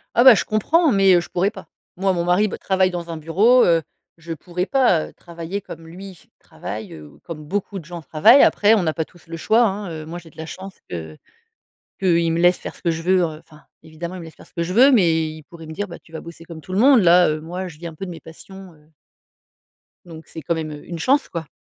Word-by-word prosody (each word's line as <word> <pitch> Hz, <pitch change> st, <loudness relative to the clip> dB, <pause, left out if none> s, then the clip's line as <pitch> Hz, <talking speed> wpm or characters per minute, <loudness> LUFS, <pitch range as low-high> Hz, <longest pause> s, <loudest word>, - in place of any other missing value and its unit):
Ah 240 Hz, -, +5 dB
bah, 260 Hz, -3 st, +9 dB
je -, -, -1 dB
comprends, 305 Hz, -, +2 dB
mais 195 Hz, -3 st, +4 dB
heu, 175 Hz, -, +3 dB
je -, -, -11 dB
pourrais 190 Hz, +3 st, 0 dB
pas. -, -, -12 dB, 0.3 s
Moi, 190 Hz, +1 st, 0 dB
mon 170 Hz, -1 st, -1 dB
mari, 180 Hz, +5 st, +2 dB
bah, -, -, -6 dB
travaille 190 Hz, -1 st, +1 dB
dans 170 Hz, -1 st, -6 dB
un 165 Hz, -, -5 dB
bureau, 200 Hz, +11 st, +4 dB
heu, 165 Hz, -1 st, +3 dB, 0.4 s
je 165 Hz, 0 st, -7 dB
pourrais 180 Hz, +3 st, -4 dB
pas, 245 Hz, -, +2 dB
heu, -, -, -16 dB
travailler 170 Hz, +3 st, -7 dB
comme 165 Hz, -3 st, -11 dB
lui 190 Hz, +3 st, -10 dB
f -, -, -22 dB
travaille. 105 Hz, +2 st, -8 dB
Heu, 75 Hz, -1 st, -11 dB
ou -, -, -19 dB
comme 165 Hz, -3 st, -9 dB
beaucoup 200 Hz, +4 st, -4 dB
de 165 Hz, -, -14 dB
gens 170 Hz, +1 st, -8 dB
travaillent. 215 Hz, -, +5 dB
Après, 210 Hz, +1 st, +4 dB
on 210 Hz, -5 st, +2 dB
n'a 160 Hz, -2 st, 0 dB
pas 160 Hz, -, -3 dB
tous 175 Hz, 0 st, -22 dB
le 165 Hz, 0 st, -7 dB
choix 220 Hz, +7 st, +2 dB
hein, 200 Hz, -3 st, -2 dB
heu 155 Hz, -1 st, -7 dB
moi, 165 Hz, +2 st, -7 dB
j'ai 165 Hz, -1 st, -16 dB
de -, -, -25 dB
la 160 Hz, -, -6 dB
chance 190 Hz, +4 st, -9 dB
que 80 Hz, -3 st, -7 dB, 0.8 s
qu'il 170 Hz, -3 st, +2 dB
me 165 Hz, -, -1 dB
laisse 175 Hz, +1 st, +4 dB
faire -, -, -8 dB
ce -, -, -20 dB
que 170 Hz, -, +1 dB
je 165 Hz, 0 st, -3 dB
veux, 185 Hz, +2 st, +3 dB
heu. 160 Hz, -3 st, -3 dB
Enfin, 155 Hz, -1 st, -19 dB, 0.2 s
évidemment, 165 Hz, +3 st, -8 dB
il 185 Hz, -, -7 dB
me -, -, -9 dB
laisse 160 Hz, -, -12 dB
faire -, -, -16 dB
ce -, -, -26 dB
que 170 Hz, -, -3 dB
je 170 Hz, +2 st, -3 dB
veux, 255 Hz, +7 st, +6 dB
mais 165 Hz, -8 st, +3 dB
il 155 Hz, 0 st, -11 dB
pourrait 165 Hz, +1 st, -13 dB
me 160 Hz, -, -8 dB
dire: 205 Hz, +6 st, -4 dB
«Bah, 170 Hz, -, -9 dB
tu 165 Hz, -, -24 dB
vas 160 Hz, -, -6 dB
bosser 170 Hz, 0 st, -12 dB
comme 165 Hz, -1 st, -10 dB
tout 185 Hz, -, -11 dB
le 190 Hz, -, 0 dB
monde». 260 Hz, +2 st, +6 dB
Là, 175 Hz, 0 st, +5 dB
heu, 155 Hz, 0 st, -2 dB
moi, 180 Hz, +4 st, -6 dB
je 160 Hz, -3 st, -13 dB
vis 170 Hz, -, -8 dB
un 165 Hz, -, -10 dB
peu 195 Hz, +5 st, -7 dB
de -, -, -7 dB
mes 170 Hz, -, -9 dB
passions, 190 Hz, +3 st, -13 dB
heu 150 Hz, 0 st, -25 dB, 1.2 s
donc 160 Hz, -2 st, -12 dB
c'est 160 Hz, -, -9 dB
quand 165 Hz, +4 st, -1 dB
même 160 Hz, -1 st, -4 dB
heu, 145 Hz, -1 st, -9 dB
une 170 Hz, -1 st, -6 dB
chance 275 Hz, -, +1 dB
quoi. 165 Hz, -3 st, -6 dB
170 Hz, 280 wpm, -21 LUFS, 160-195 Hz, 1.2 s, bah